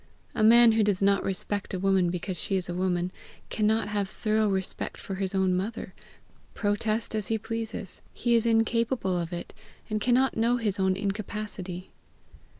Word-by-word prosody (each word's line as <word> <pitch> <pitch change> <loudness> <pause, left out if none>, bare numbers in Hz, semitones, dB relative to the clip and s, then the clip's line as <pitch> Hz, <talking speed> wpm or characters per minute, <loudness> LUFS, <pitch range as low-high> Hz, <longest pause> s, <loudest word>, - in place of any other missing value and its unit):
A - - -2
man 230 +2 +7
who 220 0 +2
does 200 -2 +1
not 200 0 +3
respect 195 +1 -3
a - - -3
woman 190 -2 +2
because 180 +2 -3
she 195 - -1
is 185 -2 -1
a 175 - -3
woman, 180 0 0 0.4
cannot 215 0 +1
have 205 -2 -1
thorough 215 +1 +1
respect 190 -1 -3
for 195 - -6
his 190 0 -3
own 190 -1 +2
mother, 195 0 -4 0.6
protest 215 +2 -1
as 215 -2 -1
he 225 - +1
pleases: 225 -3 -5
he 240 0 0
is 230 0 +3
incapable 225 -3 +1
of 170 -1 -2
it, 175 0 -6 0.4
and 215 0 -1
cannot 250 +3 +3
know 235 +2 +2
his 210 -4 0
own 190 0 +2
incapacity. 195 -2 -4
205 Hz, 170 wpm, -27 LUFS, 190-225 Hz, 0.6 s, man